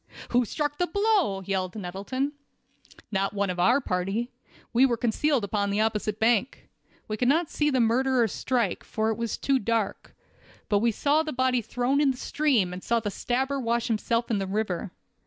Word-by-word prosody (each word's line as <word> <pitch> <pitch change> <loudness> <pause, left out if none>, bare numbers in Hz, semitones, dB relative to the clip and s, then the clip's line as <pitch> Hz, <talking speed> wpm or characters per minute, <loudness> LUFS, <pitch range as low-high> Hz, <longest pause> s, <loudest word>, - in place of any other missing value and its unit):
"Who 245 0 +3
struck 295 +4 -3
the 355 - +2
blow?" 395 - +1
yelled 190 -1 -2
Nettleton. 205 +9 -3 0.8
"No 195 -1 +1
one 200 -2 -1
of 180 - -6
our 240 +10 +4
party. 195 +2 -2 0.4
We 240 +3 +5
were 245 -3 +3
concealed 245 +3 +1
upon 200 0 -1
the 205 +2 +1
opposite 215 -1 -1
bank. 235 +2 +1 0.4
We 215 - -3
could 245 - +1
not 320 +4 +2
see 295 0 +1
the 260 -3 +1
murderer 245 +1 +3
strike, 235 -1 -1
for 220 0 -1
it - - -1
was 230 0 -3
too 275 -1 +1
dark; 225 -2 -2 0.5
but 205 - +3
we 230 +2 +2
saw 290 +7 +2
the 315 -1 -4
body 255 -1 +1
thrown 250 +5 0
in 290 - +4
the 260 - -1
stream, 250 -12 +1
and 180 - -7
saw 235 0 +1
the 210 -2 -3
stabber 265 +7 -1
wash 235 -1 0
himself 230 +2 0
in 210 - +1
the 195 - -2
river. 195 -2 -2
230 Hz, 190 wpm, -26 LUFS, 205-265 Hz, 0.8 s, We